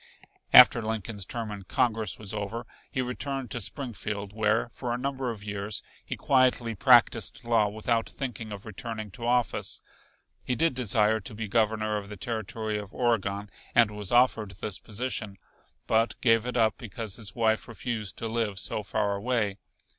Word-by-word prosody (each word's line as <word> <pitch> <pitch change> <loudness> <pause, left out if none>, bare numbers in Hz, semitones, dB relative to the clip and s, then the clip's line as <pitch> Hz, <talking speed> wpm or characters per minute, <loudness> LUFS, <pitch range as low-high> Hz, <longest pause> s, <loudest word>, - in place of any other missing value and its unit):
After - - +9
Lincoln's 110 -2 -2
term 115 0 -3
in 105 -1 -6
Congress 110 0 0
was 105 -2 -7
over 105 +2 -4 0.2
he 130 -3 -1
returned 130 -1 -3
to 120 - -1
Springfield, 105 -5 -4
where, 110 0 +2
for 120 +1 -5
a 120 - 0
number 135 0 -2
of 110 -3 -6
years, 105 0 -3 0.2
he - - -5
quietly 130 -3 +2
practised 120 0 +4
law 115 -3 +3
without 110 +2 -1
thinking 120 -5 -5
of 100 0 -7
returning 110 0 -6
to 115 +3 -6
office. 120 -1 +1 0.6
He 125 - -1
did 165 +4 +2
desire 110 -3 +2
to 105 +1 -7
be 110 0 -4
Governor 110 0 +1
of 100 -1 -6
the 105 - -8
Territory 110 0 -3
of 100 -1 -9
Oregon 105 -4 0 0.2
and 115 -3 +6
was 105 -2 -4
offered 120 -4 +4
this 105 -1 -5
position, 110 -2 -3 0.5
but 115 +1 +1
gave 115 -1 +3
it 125 - -2
up 110 -2 +3
because 110 -3 -5
his 105 -4 -3
wife 110 -2 +1
refused 115 -4 -4
to 115 - -3
live 110 -3 -1
so 105 - -2
far 105 0 0
away. 105 -2 -1
110 Hz, 170 wpm, -28 LUFS, 105-120 Hz, 0.6 s, After